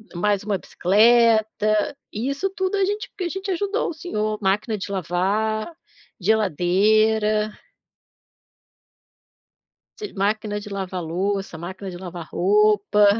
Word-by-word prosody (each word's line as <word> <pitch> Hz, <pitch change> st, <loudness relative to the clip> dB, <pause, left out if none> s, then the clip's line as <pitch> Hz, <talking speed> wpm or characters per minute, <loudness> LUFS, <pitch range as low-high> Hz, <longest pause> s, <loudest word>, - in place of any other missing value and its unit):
mais 205 Hz, +3 st, +1 dB
1 205 Hz, -2 st, -1 dB
bicicleta. 220 Hz, +4 st, +3 dB, 0.2 s
E 230 Hz, +6 st, -2 dB
isso 280 Hz, +8 st, -1 dB
tudo 380 Hz, +1 st, -1 dB
a 390 Hz, -, +3 dB
gente, 415 Hz, +2 st, -3 dB
porque 370 Hz, -, -5 dB
a -, -, -1 dB
gente 385 Hz, +2 st, -4 dB
ajudou 405 Hz, +5 st, -1 dB
o -, -, -4 dB
senhor. 215 Hz, -10 st, -3 dB
Máquina 210 Hz, +3 st, 0 dB
de 200 Hz, -, -5 dB
lavar, 200 Hz, -, -1 dB, 0.5 s
geladeira. 215 Hz, +3 st, +2 dB, 2.5 s
Se 420 Hz, -, -6 dB
máquina 205 Hz, +1 st, -1 dB
de 205 Hz, -, -9 dB
lavar 190 Hz, -3 st, -4 dB
louça, 195 Hz, +2 st, -2 dB
máquina 185 Hz, +4 st, -7 dB
de 175 Hz, -, -7 dB
lavar 175 Hz, -2 st, -8 dB
roupa. 210 Hz, +2 st, +3 dB
210 Hz, 125 wpm, -23 LUFS, 195-220 Hz, 2.5 s, bicicleta